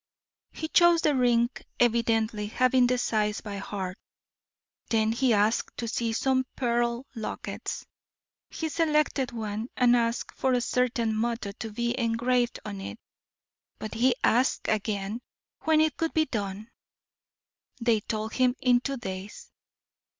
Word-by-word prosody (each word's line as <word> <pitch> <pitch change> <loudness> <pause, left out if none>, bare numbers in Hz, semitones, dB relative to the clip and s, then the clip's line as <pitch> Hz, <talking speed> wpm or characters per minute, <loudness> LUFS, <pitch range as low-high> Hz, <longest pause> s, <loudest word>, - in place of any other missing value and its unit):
"He 315 - -5
chose 345 0 +5
the 300 - +3
ring, 240 -2 +3 0.3
evidently 225 -3 +2
having 255 +2 +3
the 250 0 +1
size 215 -3 0
by 205 -2 -6
heart. 190 -2 -5 0.9
Then 220 -1 +2
he 245 +2 +2
asked 215 +1 +1
to 235 - -3
see 230 0 -1
some 260 +3 +1
pearl 240 0 0
lockets. 225 -3 -5 0.6
He 320 - -3
selected 300 -5 +1
one, 220 -1 -4
and 245 -1 +5
asked 235 0 0
for 260 -1 +1
a 245 - +2
certain 235 -3 0
motto 230 -2 -1
to 220 +2 -7
be 235 +3 -1
engraved 240 +1 +1
on 200 -2 -5
it. - - -6 0.8
But 215 - -6
he 240 +2 +3
asked 250 +3 +2
again 210 +1 -1 0.4
when 315 -1 +4
it 315 -3 +2
could 325 0 -2
be 315 -1 +4
done. 210 -2 -4 1.1
They 230 -2 +2
told 215 +1 -4
him 255 -1 +2
in 250 -1 +4
two 275 +1 -3
days. 190 -2 -7
235 Hz, 140 wpm, -27 LUFS, 215-255 Hz, 1.1 s, chose